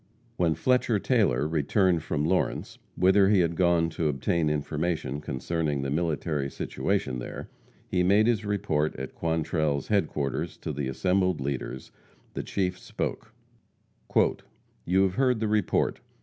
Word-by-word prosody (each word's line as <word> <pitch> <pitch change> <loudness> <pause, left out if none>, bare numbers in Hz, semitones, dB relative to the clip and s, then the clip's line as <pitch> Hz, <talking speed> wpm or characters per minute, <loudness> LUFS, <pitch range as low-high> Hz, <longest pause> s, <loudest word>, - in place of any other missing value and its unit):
When 85 -6 +1
Fletcher 125 - +2
Taylor 95 - +2
returned 85 +3 +2
from 75 -1 -1
Lawrence, 90 +3 -1 0.2
whither 95 +1 +4
he 100 -3 +5
had 85 0 0
gone 85 -2 +2
to 80 0 -1
obtain 75 +3 0
information 75 -1 -2
concerning 75 +1 -2
the 70 - -2
military 75 -3 -1
situation 65 -1 -2
there, - - -7 0.4
and 90 -1 +3
made 105 +3 +5
his 115 -3 +1
report 80 -7 0
at 65 +1 -6
Quantrell's 80 -3 -1
headquarters 75 -9 -1
to - - -5
the 70 -1 -3
assembled 90 +5 +1
leaders, 65 -1 -4 0.4
the - - -3
Chief 90 -2 -2
spoke: - - -4 1.6
"You 95 +2 +4
have 95 -2 +1
heard 125 -1 +2
the 110 - 0
report. 105 -3 +1
85 Hz, 135 wpm, -27 LUFS, 75-95 Hz, 1.6 s, he